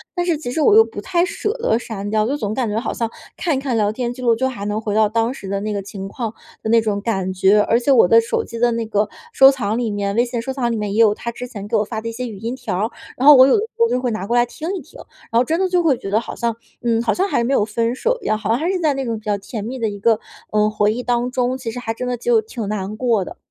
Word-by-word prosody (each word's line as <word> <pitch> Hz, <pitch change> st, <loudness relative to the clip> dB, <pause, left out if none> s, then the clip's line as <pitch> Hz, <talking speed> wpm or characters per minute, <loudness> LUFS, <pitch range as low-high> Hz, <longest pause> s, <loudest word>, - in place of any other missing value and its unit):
但 350 Hz, -1 st, 0 dB
是 340 Hz, -3 st, +1 dB
其 285 Hz, -5 st, -5 dB
实 285 Hz, -, -2 dB
我 415 Hz, +7 st, +5 dB
又 445 Hz, -, +9 dB
不 -, -, -8 dB
太 345 Hz, -2 st, +1 dB
舍 420 Hz, +3 st, -2 dB
得 335 Hz, -, +2 dB
删 205 Hz, -4 st, -6 dB
掉， 215 Hz, 0 st, +1 dB
就 275 Hz, -, 0 dB
总 215 Hz, -7 st, -3 dB
感 250 Hz, 0 st, -1 dB
觉 210 Hz, -, -2 dB
好 235 Hz, -, -3 dB
像 230 Hz, -1 st, -2 dB, 0.3 s
看 330 Hz, -5 st, 0 dB
一 -, -, -1 dB
看 265 Hz, -4 st, -1 dB
聊 210 Hz, -2 st, +2 dB
天 240 Hz, +2 st, -3 dB
记 255 Hz, -, -10 dB
录 235 Hz, -2 st, +3 dB
就 260 Hz, +3 st, 0 dB
还 205 Hz, -6 st, -6 dB
能 210 Hz, +1 st, -2 dB
回 210 Hz, -2 st, -3 dB
到 215 Hz, 0 st, +4 dB
当 230 Hz, +3 st, 0 dB
时 200 Hz, -, -9 dB
的 195 Hz, +1 st, -2 dB
那 215 Hz, +1 st, -3 dB
个 200 Hz, -, -2 dB
情 195 Hz, 0 st, -7 dB
况 225 Hz, +1 st, -4 dB, 0.3 s
的 220 Hz, -, -3 dB
那 230 Hz, 0 st, +5 dB
种 210 Hz, -2 st, -1 dB
感 195 Hz, -4 st, -1 dB
觉。 190 Hz, +3 st, +4 dB
而 230 Hz, +3 st, +2 dB
且 250 Hz, -, -2 dB
我 250 Hz, -7 st, +6 dB
的 230 Hz, +5 st, +6 dB
手 230 Hz, -, -1 dB
机 230 Hz, -, -8 dB
的 240 Hz, 0 st, +3 dB
那 230 Hz, 0 st, -2 dB
个 210 Hz, -1 st, 0 dB, 0.3 s
收 270 Hz, -, +8 dB
藏 225 Hz, -5 st, -2 dB
里 235 Hz, -3 st, -1 dB
面， 200 Hz, -1 st, -2 dB
微 240 Hz, -, +4 dB
信 240 Hz, -1 st, -3 dB
收 265 Hz, -, -4 dB
藏 255 Hz, -3 st, -1 dB
里 -, -, -1 dB
面 210 Hz, -2 st, -3 dB
也 215 Hz, -, 0 dB
有 215 Hz, -2 st, +5 dB
他 235 Hz, +2 st, -5 dB
之 250 Hz, +2 st, -7 dB
前 205 Hz, -5 st, -8 dB
给 -, -, 0 dB
我 210 Hz, -, +2 dB
发 220 Hz, +1 st, -5 dB
的 230 Hz, -, -4 dB
一 -, -, -5 dB
些 250 Hz, +2 st, -5 dB
语 215 Hz, -4 st, -8 dB
音 230 Hz, +3 st, -3 dB
条 245 Hz, -8 st, -4 dB
儿， 215 Hz, +4 st, -1 dB, 0.3 s
然 255 Hz, -, -1 dB
后 295 Hz, -, +11 dB
我 260 Hz, 0 st, +8 dB
有 -, -, +4 dB
的 -, -, +1 dB
时 450 Hz, -, -3 dB
候 465 Hz, -, +5 dB
就 250 Hz, -, +1 dB
会 250 Hz, -2 st, -1 dB
拿 215 Hz, -3 st, -4 dB
过 235 Hz, -, 0 dB
来 240 Hz, 0 st, +4 dB
听 305 Hz, +6 st, -7 dB
一 375 Hz, -, -5 dB
听， -, -, -16 dB, 0.3 s
然 230 Hz, -, +3 dB
后 -, -, +4 dB
真 320 Hz, +7 st, -1 dB
的 380 Hz, -, +2 dB
就 355 Hz, -1 st, +2 dB
会 305 Hz, -5 st, +3 dB
觉 195 Hz, -, -6 dB
得 215 Hz, -, +3 dB
好 -, -, -7 dB
像 235 Hz, -2 st, -1 dB, 0.3 s
嗯， 230 Hz, -1 st, +1 dB
好 225 Hz, -, +1 dB
像 380 Hz, +2 st, 0 dB
还 240 Hz, -, +1 dB
没 255 Hz, +4 st, 0 dB
有 240 Hz, -, +3 dB
分 230 Hz, +2 st, -1 dB
手 -, -, 0 dB
一 -, -, -12 dB
样， 215 Hz, -, +2 dB
好 215 Hz, -1 st, -5 dB
像 230 Hz, -, +3 dB
还 330 Hz, +4 st, -1 dB
是 380 Hz, -, -1 dB
在 310 Hz, -4 st, +2 dB
那 270 Hz, -1 st, -3 dB
种 230 Hz, -2 st, -2 dB
比 215 Hz, -, -24 dB
较 205 Hz, -1 st, 0 dB
甜 200 Hz, +2 st, -6 dB
蜜 255 Hz, +4 st, -5 dB
的 225 Hz, -, 0 dB
一 205 Hz, -1 st, -7 dB
个， 225 Hz, +1 st, +3 dB, 0.3 s
嗯， 210 Hz, 0 st, +3 dB
回 210 Hz, 0 st, +2 dB
忆 245 Hz, +2 st, -4 dB
当 245 Hz, 0 st, 0 dB
中， 250 Hz, 0 st, 0 dB
其 250 Hz, -3 st, -5 dB
实 225 Hz, -, -8 dB
还 225 Hz, -2 st, -3 dB
真 250 Hz, +2 st, -5 dB
的 250 Hz, 0 st, -1 dB
就 235 Hz, -1 st, +2 dB
挺 220 Hz, 0 st, -6 dB
难 210 Hz, 0 st, -3 dB
过 230 Hz, -5 st, +1 dB
的。 -, -, -10 dB
230 Hz, 355 characters per minute, -20 LUFS, 215-255 Hz, 0.3 s, 后